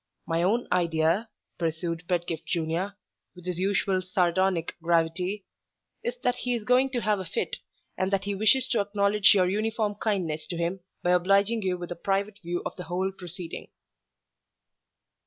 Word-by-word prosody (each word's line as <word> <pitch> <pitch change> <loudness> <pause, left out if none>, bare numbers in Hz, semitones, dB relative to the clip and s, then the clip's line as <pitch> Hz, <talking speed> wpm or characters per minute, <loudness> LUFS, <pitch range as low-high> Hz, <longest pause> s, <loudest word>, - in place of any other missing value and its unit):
My 165 0 0
own 215 +7 +2
idea," 170 +4 +2 0.3
pursued 165 +1 -2
Pedgift 170 -3 -2
Junior, 170 +4 -1 0.4
with 180 -1 -13
his 180 -1 -2
usual, 195 0 +1
sardonic 185 -2 +1
gravity, 170 +4 +1 0.6
"is 480 +1 -2
that 250 0 +2
he 245 -1 0
is 230 - -4
going 250 +4 +4
to 240 - 0
have 210 -2 +1
a - - -3
fit, 455 - -2 0.4
and 185 - +1
that 195 -1 +1
he 200 0 -2
wishes 215 +6 +4
to 240 - +2
acknowledge 200 0 +4
your 185 -2 +4
uniform 215 +2 0
kindness 185 -7 -2
to 175 - -4
him 170 +3 -1 0.2
by 175 - +3
obliging 200 +5 +3
you 185 -2 0
with 175 -1 -7
a - - -2
private 200 +3 -1
view 175 0 -3
of - - -4
the 180 - -6
whole 185 +4 -1
proceeding." 180 -2 -6
185 Hz, 165 wpm, -27 LUFS, 175-205 Hz, 0.6 s, going